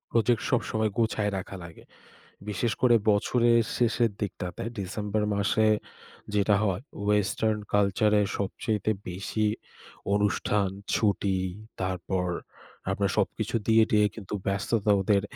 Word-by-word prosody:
Project 115 0 +2
সবসময় 110 -3 +1
গোছায় 110 -2 +1
রাখা 95 +1 -7
লাগে। 85 -1 -12 0.6
বিশেষ 105 +3 0
করে 120 -2 +6
বছরের 115 +3 +3 0.2
শেষের 115 -1 +2
দিকটাতে, 90 +1 -4 0.2
ডিসেম্বর 105 +2 -2
মাসে 105 +2 +2 0.7
যেটা 105 0 +3
হয়, 95 -1 -1 0.2
ওয়েস্টার্ন 105 +1 +1 0.2
কালচারে 105 +1 +3 0.2
সবচাইতে 105 +1 -1 0.2
বেশি 100 +4 -1 0.7
অনুষ্ঠান, 105 -1 +1 0.3
ছুটি 100 -2 +1 0.4
তারপর 95 0 -1 0.6
আপনার - - 0
সবকিছু - - 0
দিয়ে 110 0 +6
টিয়ে 105 -1 +4
কিন্তু 105 -2 -7
ব্যস্ততা 100 +2 +1
ওদের 100 +1 +2
105 Hz, 110 wpm, -27 LUFS, 100-110 Hz, 0.7 s, করে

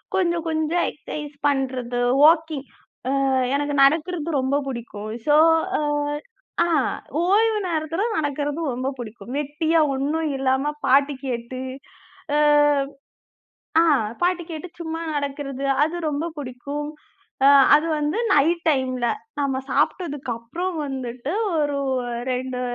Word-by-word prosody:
கொஞ்சம், 340 -3 +1
கொஞ்சம் 315 +2 0
எக்ஸர்சைஸ் 295 +1 -7
பண்றது, 255 -3 -1 0.2
வாக்கிங் 315 -3 +4 0.4
அ - - +1 0.4
எனக்கு 290 0 -1
நடக்கிறது 320 +3 +2
ரொம்ப 265 +2 +1
பிடிக்கும். 225 -4 -6 0.2
சோ, 295 - +5 0.4
அ, - - -1 0.8
அ, - - +1 0.6
ஓய்வு 430 +4 +3
நேரத்துல 325 +3 -1
நடக்கிறது 290 0 -1
ரொம்ப 255 +2 -2
பிடிக்கும். 235 +1 -8
வெட்டியா 310 +3 +1 0.2
ஒண்ணும் 305 +3 -1
இல்லாம, 265 +2 +1
பாட்டு 280 +2 +4
கேட்டு, 250 0 -4 0.8
அ. - - +3 1.4
அ, - - +5 0.4
பாட்டு 355 -1 +1
கேட்டு 320 +3 -6
சும்மா 325 0 -4
நடக்கிறது. 280 -1 -3 0.2
அது 320 +3 -1
ரொம்ப 295 +2 -2
பிடிக்கும். 285 +3 -5 0.6
அ, - - +8 0.3
அது 305 +3 +2
வந்து 300 +9 0
நைட் 335 +4 +3
டைம்ல. 255 -4 0 0.3
நம்ம 275 -2 0
சாப்பிட்டதுக்கு 290 -8 0
அப்புறம் 335 +11 -4
வந்துட்டு 260 +2 -4 0.2
ஒரு 290 -2 0 0.5
2 250 0 -3
290 Hz, 115 wpm, -23 LUFS, 260-320 Hz, 1.4 s, அ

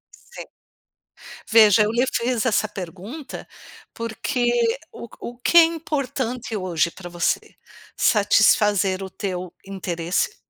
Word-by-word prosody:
Sim, - - -12 1.1
veja 215 -1 +7
eu 210 - +1
lhe 240 +2 +2
fiz 235 -1 0
essa 215 -2 +1
pergunta, 200 - -8 0.5
porque 230 +2 -2 0.4
o 235 - -9
o 240 +1 -8
que 295 - 0
é 335 - +9
importante 270 -8 -3
hoje 175 -3 0
pra 175 +1 -10
você? 175 -1 -2 0.4
Satisfazer 205 -2 +3
o 190 - -5
teu 185 -3 -5
interesse, 185 - -2
215 Hz, 115 wpm, -22 LUFS, 185-245 Hz, 1.1 s, é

